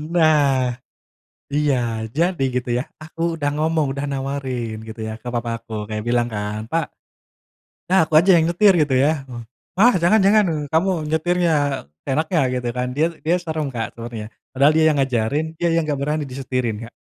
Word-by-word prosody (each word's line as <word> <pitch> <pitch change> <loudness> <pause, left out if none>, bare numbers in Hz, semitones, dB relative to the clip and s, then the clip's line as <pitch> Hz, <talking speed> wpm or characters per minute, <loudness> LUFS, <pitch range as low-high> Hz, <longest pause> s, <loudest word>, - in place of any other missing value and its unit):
Nah, 140 -6 +3 0.7
iya, 145 -1 +2 0.4
jadi 170 -2 +1
gitu 125 -1 -2
ya, 125 - -1 0.2
aku 165 +1 -3
udah 145 -3 -1
ngomong, 155 0 +1
udah 140 +1 -3
nawarin 135 -4 -3
gitu 110 0 -8
ya, 110 - -4
ke - - -10
papa 115 -1 -2
aku 115 0 -12 0.2
kayak 105 -1 -3
bilang 120 0 +2
kan, 105 0 -3
"Pak, 165 -1 +1 1.0
udah 185 - +3
aku 155 - -12
aja 185 +4 +1
yang 165 - +3
nyetir" 195 +3 +5
gitu 140 -3 0
ya. 150 - +4 0.7
"Wah, 240 +6 +6
jangan 200 +6 +4
jangan. 210 +1 +5 0.3
Kamu, 165 +4 +2 0.2
nyetirnya 160 -3 +1 0.2
seenaknya" 155 +5 0
Gitu 125 -1 -2
kan. 125 0 -1
Dia 155 +3 +3 0.2
dia 170 +3 +3
serem 160 -3 -3
Kak 115 -2 -4
sebenarnya. 115 -2 -7 0.3
Padahal 140 +3 +5
dia 160 - +4
yang 150 - +1
ngajarin, 135 +3 0
dia 170 - +1
yang 165 0 +2
nggak 145 -2 -1
berani 150 +2 -1
disetirin 125 -4 -3
Kak. - - -45
145 Hz, 170 wpm, -21 LUFS, 125-160 Hz, 1.0 s, Wah